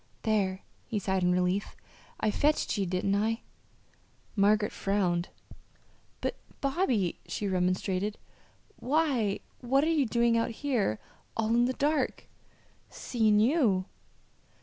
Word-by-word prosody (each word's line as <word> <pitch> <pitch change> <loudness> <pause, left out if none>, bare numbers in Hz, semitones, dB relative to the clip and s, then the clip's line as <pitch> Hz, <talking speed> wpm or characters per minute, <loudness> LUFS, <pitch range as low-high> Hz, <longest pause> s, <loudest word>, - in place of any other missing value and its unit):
"There!" 200 -4 0 0.2
he 225 - -2
sighed 190 -1 0
in 180 0 +3
relief. 180 +2 0 0.4
"I 215 - +1
fetched 300 +7 +1
ye, 200 -3 -1
didn't 185 +2 0
I?" 220 +3 0 0.9
Margaret 210 +1 +3
frowned. 185 -4 0 0.9
"But, - - -1 0.3
Bobby," 265 - 0
she 205 - -3
remonstrated, 185 +2 0 0.6
"why 260 -8 +1 0.2
what 265 +3 +2
are 320 - +2
you 290 -5 +2
doing 235 +1 +2
out 230 +1 +1 0.2
here, 225 - +1 0.4
all 220 -1 0
in 240 +1 +4
the 255 - 0
dark?" 295 +3 0 0.6
"Seein' 220 -4 +1
you." 220 - +3
215 Hz, 120 wpm, -29 LUFS, 190-245 Hz, 0.9 s, in